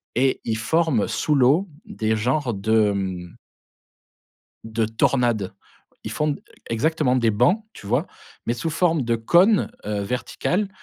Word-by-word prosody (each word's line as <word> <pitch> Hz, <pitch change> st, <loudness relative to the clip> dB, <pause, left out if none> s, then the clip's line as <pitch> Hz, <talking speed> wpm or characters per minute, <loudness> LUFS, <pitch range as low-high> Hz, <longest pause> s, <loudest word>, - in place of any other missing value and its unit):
et 130 Hz, +2 st, +1 dB
ils 110 Hz, -1 st, -1 dB
forment 145 Hz, 0 st, +1 dB
sous 150 Hz, -, 0 dB
l'eau 145 Hz, +9 st, +3 dB, 0.2 s
des 110 Hz, -1 st, -1 dB
genres 125 Hz, +3 st, 0 dB
de, 110 Hz, +1 st, +2 dB
mmh 95 Hz, -3 st, -4 dB, 1.3 s
de 110 Hz, 0 st, -1 dB
tornade. 110 Hz, -3 st, +1 dB, 0.5 s
Ils -, -, -5 dB
font, 150 Hz, -1 st, 0 dB
e -, -, -14 dB, 0.3 s
exactement, 130 Hz, +2 st, +1 dB
des 120 Hz, -3 st, +3 dB
bancs, 150 Hz, -, +2 dB
tu 100 Hz, -, -12 dB
vois? 125 Hz, -, +1 dB, 0.4 s
Mais 120 Hz, -, +1 dB
sous 160 Hz, +7 st, -3 dB
forme 165 Hz, -1 st, +1 dB
de 115 Hz, -1 st, 0 dB
cône, 175 Hz, -, +3 dB, 0.2 s
heu, 105 Hz, -1 st, -1 dB
vertical 170 Hz, -, -2 dB
120 Hz, 145 wpm, -23 LUFS, 110-155 Hz, 1.3 s, l'eau